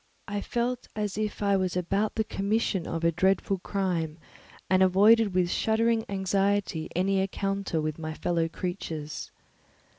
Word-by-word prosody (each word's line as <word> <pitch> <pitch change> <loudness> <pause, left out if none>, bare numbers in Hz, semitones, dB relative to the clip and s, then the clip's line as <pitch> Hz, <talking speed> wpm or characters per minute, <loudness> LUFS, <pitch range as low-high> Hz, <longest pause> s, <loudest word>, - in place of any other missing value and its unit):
I 205 0 -2
felt 245 +2 -2
as 210 -2 -2
if 210 0 -2
I 200 -1 +3
was 185 -1 0
about 195 +4 0
the 220 - +1
commission 200 -3 -1
of 165 0 -3
a 170 - +4
dreadful 190 +2 +1
crime 175 -5 -2 0.5
and 185 0 +3
avoided 200 +2 +5
with 180 -1 +2
shuddering 225 0 +2
anxiety 195 -3 0
any 190 +2 +2
encounter 195 -2 -1
with 155 0 -3
my 155 -1 -4
fellow 165 -1 0
creatures. 165 -4 -5
195 Hz, 145 wpm, -28 LUFS, 175-205 Hz, 0.5 s, avoided